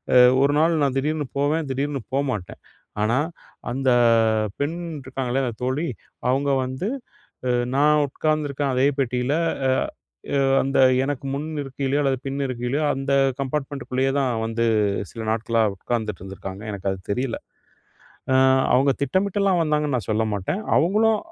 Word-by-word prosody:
அ - - +8 0.3
ஒரு 140 - +3
நாள் 165 0 +3
நான் 135 -1 +1
திடீர்னு 150 +1 -1
போவேன். 150 +2 +1
திடீர்னு 140 +1 -2
போமாட்டேன். 130 -10 -2 0.4
ஆனா 110 +3 +2 0.6
அந்த 130 +1 0 0.7
பெண் 145 +4 -1 0.3
இருக்காங்களே, 130 0 -2
அந்த 120 -3 -3
தோழி. 135 +6 -1 0.4
அவங்க 140 +2 +1 0.2
வந்து 130 +9 -4 0.9
நான் 150 +2 +4
அ - - +3
உட்காந்துருக்கேன். 145 -1 -1
அதே 130 +1 +3
பெட்டியில 125 +1 0 0.4
அ - - +4 0.7
அ - - +3 0.2
அந்த 135 +1 -1 0.3
எனக்கு 145 0 -3
முன் 145 +3 -3 0.2
இருக்கையிலையோ, 135 +1 -2
அல்லது 135 -1 +1
பின் 135 +1 -3
இருக்கைலையோ, 130 +4 -2
அந்த 135 +1 -3 0.3
கம்பார்ட்மெண்ட்குள்ளேயே 135 -1 -2
தான் 135 -2 +1 0.2
வந்து, 115 +1 -1 0.5
சில 115 - -7
நாட்களா 115 +1 +1
உக்காந்துட்டு 110 -1 -3
இருந்திருக்காங்க. 95 +1 -8
எனக்கு 100 -1 -3
அது 95 - -4
தெரியல. 125 +2 -1 1.0
அ - - +4 0.4
அவங்க 135 +2 +4
திட்டமிட்டலாம் 190 +4 +1
வந்தாங்கன்னு 150 -3 +1
நான் 110 -7 -5
சொல்ல 110 +1 +1
மாட்டேன், 100 - -2 0.2
அவங்களும் 215 +5 +3
135 Hz, 140 wpm, -23 LUFS, 125-145 Hz, 1.0 s, அ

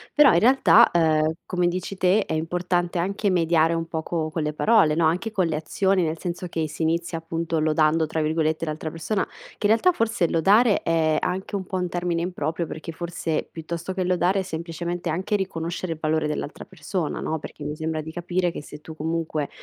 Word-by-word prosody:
però 295 -2 +7
in 170 - +5
realtà, 235 0 +6
ehm, 160 -2 +2
come 180 -1 0
dici 185 +2 -3
te 190 +3 +3
è - - -4
importante 175 +2 -1
anche 200 +4 0
mediare 165 -2 +3
un 165 0 -2
poco 160 -1 -3
con 160 - -2
le 150 0 -1
parole, 200 -3 +4
no, 165 0 +2
anche 175 +8 +1
con 190 -4 +1
le 160 -2 -1
azioni 190 +4 +1
nel 160 -1 -1
senso 175 +1 -4
che, 160 -2 -2
si 155 +2 -8
inizia 165 +1 0
appunto 165 0 -2
"lodando" 155 +1 +2
tra 155 0 -1
virgolette 155 +1 0
l'altra 155 0 -4
persona, 165 +6 -2 0.3
che 205 - +1
in 215 - +5
realtà 295 +11 +4
forse 225 - 0
lodare 205 +7 +4
è 160 -2 +2
anche 190 +3 -2
un 190 - -5
po' 190 - -5
un 180 -1 -1
termine 175 -1 -1
improprio 170 -1 -2
perché 160 +1 -7
forse 170 -2 -3
piuttosto 170 +3 -5
che 185 -1 -1
lodare 180 +2 +2
è - - +1
semplicemente 170 +1 -4
anche 190 +6 -1
riconoscere 175 -2 -3
il 165 - -3
valore 155 0 0
dell'altra 150 0 -4
persona, 175 -1 -4
no, 160 - -2
perché 145 0 -9
mi 150 +1 -3
sembra 160 0 -3
di 160 +1 -8
capire 175 +1 -1
che 150 - -7
se 150 - -10
tu 160 +1 -10
comunque 160 -1 -2
170 Hz, 205 wpm, -24 LUFS, 160-185 Hz, 0.3 s, però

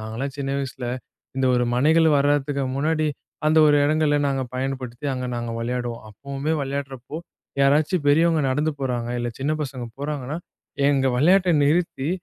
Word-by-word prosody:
நாங்கலாம் 115 +5 -5
சின்ன 135 -1 -2
வயசில, 130 -2 -5 0.5
இந்த 135 0 +1
ஒரு 125 0 +2
மனைகள் 160 +6 +4
வரத்துக்கு 145 0 +1
முன்னாடி, 155 +2 +1 0.4
அந்த 155 +1 +4
ஒரு 145 - +5
இடங்கள்ல, 150 -1 +2
நாங்க 135 -1 -1
பயன்படுத்தி 130 0 -4
அங்க 125 0 -3
நாங்க 120 -1 -4
விளையாடுவோம். 120 -1 -3
அப்பவுமே 140 +7 -4
விளையாடுறப்போ, 135 0 -5 0.5
யாராச்சும் 150 +4 +2
பெரியவங்க 160 +1 +4
நடந்து 150 +4 +1
போறாங்க, 120 -3 -2
இல்ல 120 - -2
சின்ன 145 +3 0
பசங்க 130 -3 -5 0.2
போறாங்கன்னா, 145 0 -3 0.5
எங்க 135 -2 +2
விளையாட்டை 180 +6 +4
நிறுத்தி, 150 -2 +1
140 Hz, 140 wpm, -23 LUFS, 130-150 Hz, 0.5 s, ஒரு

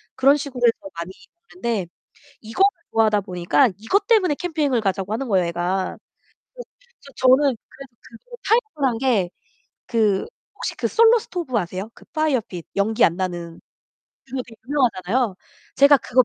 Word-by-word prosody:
그런 275 +3 +5
식으로 275 -3 -6
해서 230 -4 +1
많이 170 +2 -5 0.4
먹는데 230 - -2 0.5
이거를 235 - +2 0.2
좋아하다 215 -2 +3
보니까 180 +7 +2
이것 225 - 0
때문에 380 -10 +3
캠핑을 295 -9 -1
가자고 195 0 -2
하는 265 +4 -3
거예요, 190 -5 +2
애가. 175 +2 -2 0.6
그래서 - - -11 0.5
저 260 - +2
저는 265 0 +5
그래서 270 +4 -15
그 230 - -15
뭐 485 - -10
타협을 410 - +2
한 230 - -3
게 225 -8 +1 0.6
그 215 -4 +2 0.3
혹시 - - -4
그 - - -1
솔로 460 +1 +5
스토브 345 - -3
아세요? 185 +2 -3
그 - - -17
파이어핏 260 - -1
연기 215 +3 +1
안 170 - +4
나는 175 -3 -4 0.7
그거 260 0 -4
되게 225 -2 -14
유명하잖아요. 240 -5 0 0.4
제가 280 +1 +7
그거 255 0 +3
235 Hz, 340 characters per minute, -22 LUFS, 195-285 Hz, 0.7 s, 제가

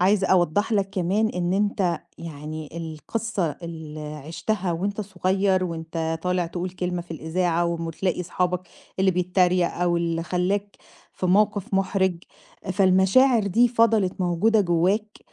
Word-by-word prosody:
عايزة 190 +1 +3
أوضّح 185 +5 +2
لك 195 -2 +1
كمان 195 +4 +1
إن 180 -1 -1
أنت، 195 -4 0 0.2
يعني 155 -1 -7
القصّة 170 +4 -3
اللي 160 -2 -7
عِشتها 170 +5 -3
وأنت 200 +5 -2
صغيّر، 190 -1 +1
وأنت 165 -1 -3
طالع 180 -1 0
تقول 175 +2 -4
كلمة 180 -1 -3
في 175 - -26
الإذاعة 170 +2 0
وتلاقي 170 +2 -2
أصحابك، 180 0 -1 0.4
اللي 190 0 +4
بيتريق 180 0 +2
أو 175 -1 +1
اللي 165 -1 -1
خلاك، 190 +4 -1 0.4
في 185 - -3
موقف 205 +1 +2
محرج، 190 -2 +1 0.5
فالمشاعر 195 +5 +4
دي 235 +6 +4
فَضَلِت 225 -6 +2
موجودة 185 +5 +3
جوّاك، 190 +4 +1
180 Hz, 130 wpm, -24 LUFS, 170-195 Hz, 0.5 s, اللي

